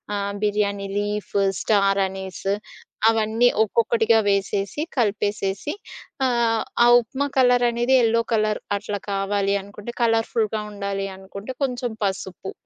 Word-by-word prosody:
ఆహ్, 200 0 -2
biryani 200 -1 0
leaf, 205 0 -3 0.3
star 200 -2 +2
అనిస్ 190 -1 -8 0.7
అవన్నీ 225 +2 +2 0.2
ఒక్కొక్కటిగా 225 +1 +2
వేసేసి, 200 +5 -1 0.2
కలిపేసేసి, 205 +1 -1 0.5
ఆహ్, 235 -2 +1 0.2
ఆ - - +6
ఉప్మా 270 +5 -3
కలరనేది 245 0 +3
ఎల్లో 230 +1 +2
కలర్ 215 -1 +1 0.2
అట్లా 205 0 -4
కావాలి 195 0 0
అనుకుంటే, 210 +4 -9
కలర్‌ఫుల్‌గా 225 -1 +1
ఉండాలి 200 -1 -3
అనుకుంటే, 200 +6 -8
కొంచెం 250 -2 -2
పసుపు. 190 -1 -4
210 Hz, 110 wpm, -23 LUFS, 200-230 Hz, 0.7 s, ఆ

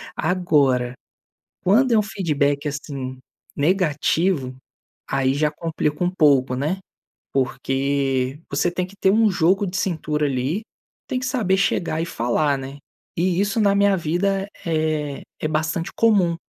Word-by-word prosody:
Agora, 145 -8 +2 0.7
quando 240 +8 +4
é - - +5
um - - +4
feedback, 150 -8 0
assim, 140 -3 -5 0.4
negativo, 155 -3 +1 0.5
aí 135 -1 +1
já 150 +1 +1
complica 150 -1 -2 0.2
pouco, 135 -4 +4
né, 150 +8 -1 0.5
porque 135 0 0
você 175 - +1
tem 180 +1 -2
que 195 +2 -17
ter 190 - +4 0.2
jogo 185 +3 +2
de 180 0 -4
cintura, 155 -5 -1
ali, 140 - -1 0.5
tem 260 - -1
que - - -5
saber 220 -7 +1
chegar 170 -4 0
e - - -2
falar, 140 0 0
né, 135 +1 -7 0.4
e 180 +1 +1
isso 205 +2 0
na 200 -2 +4
minha 200 -1 +4
vida 190 +4 0 0.2
é 155 -3 -1 0.2
é 155 - -1
bastante 155 +2 -1
comum, 195 -7 +3
155 Hz, 135 wpm, -22 LUFS, 140-185 Hz, 0.7 s, é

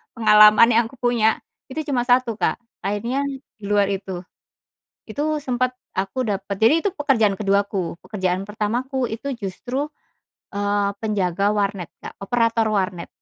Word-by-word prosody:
pengalaman 215 0 +7
yang 230 +1 +4
aku 265 - -15
punya 240 -3 +2 0.3
itu 310 +4 -4
cuma 245 -2 0
1 245 -3 +2
Kak, - - +1 0.2
akhirnya 210 +7 -2 0.4
di - - -20
luar 205 -1 +2
itu. 190 -2 -4 0.9
Itu 300 +6 -1
sempat 255 -2 0 0.2
aku 195 +6 -2
dapat 200 -1 -2
jadi 300 +9 +4
itu 405 - +1
pekerjaan 260 - +2
ke-2-ku, 200 -3 0
pekerjaan 185 -2 -1
pertamaku 240 +5 -2
itu 255 +5 -4
justru, 245 +6 -4 0.6
eee, 205 0 0
penjaga 200 -1 0
warnet 200 -4 -1 0.2
Kak, - - -9
operator 230 +2 +1
warnet. 185 -4 -1
215 Hz, 135 wpm, -22 LUFS, 200-245 Hz, 0.9 s, pengalaman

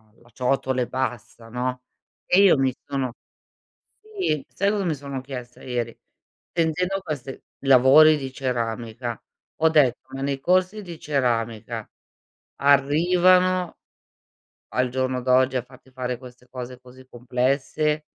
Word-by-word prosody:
la 120 +1 -23
ciotola 130 +1 0
e 120 - -1
basta, 125 -3 -4
no. 125 +2 -3 0.4
E 185 - +5
io 190 -6 +6
mi 135 -1 +2
sono 135 -3 -2 0.9
sì, 385 - -2
sai 200 +1 0
cosa 205 -1 -1
mi 165 - +1
sono 140 -1 -6
chiesta 125 -2 -9
ieri, 120 -2 -3 0.5
sentendo 175 +3 0
queste 140 -6 -6 0.2
lavori 135 +4 +7
di 135 -2 -5
ceramica 120 -2 -3 0.4
ho 160 - +6
detto: 140 -6 +4 0.2
"Ma 135 - -5
nei 140 0 -1
corsi 185 +6 +1
di 170 -4 -9
ceramica 120 -6 -2 0.7
arrivano 175 +6 +3 0.9
al 125 0 0
giorno 130 0 -1
d'oggi 130 +1 +3
a 125 - -2
farti 130 +1 -19
fare 125 -1 -3
queste 125 0 -14
cose 125 0 -7
così 130 0 -16
complesse 135 +5 -1
130 Hz, 130 wpm, -24 LUFS, 125-155 Hz, 0.9 s, lavori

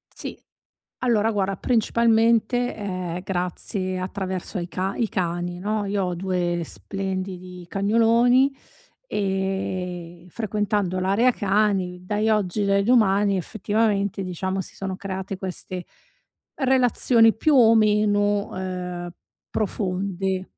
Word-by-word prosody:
Sì. - - -6 0.7
Allora 225 -2 +2
guarda, 195 -1 0
principalmente, 235 +1 +2
ehm, 185 -4 -4
grazie 185 +1 -2
attraverso 190 +1 -4
ai 175 0 -4
ca 190 +2 -2
i 230 -3 0
cani, 175 -1 -2
no, 210 +2 -1
io 200 -1 -1
ho 180 -1 -2
due 175 -1 -1
splendidi 185 -2 -5
cagnoloni, 230 +6 +3 0.6
ehm, 185 -3 -3
frequentando 205 -3 -1
l'area 210 +7 +3
cani, 195 -4 +1
dai 210 +3 0
oggi, 210 -1 +1
dai 200 0 +2
domani, 205 -4 +3
effettivamente 200 0 0
diciamo 190 +1 -3
si - - -8
sono 195 -1 -4
create 190 0 -5
queste 185 -1 -5 0.7
relazioni 250 -4 +4
più 295 +6 +2
o 230 -2 +7
meno, 205 -1 +2
ehm, 180 -2 -4 0.4
profonde. 190 -2 -2
195 Hz, 110 wpm, -24 LUFS, 185-215 Hz, 0.7 s, o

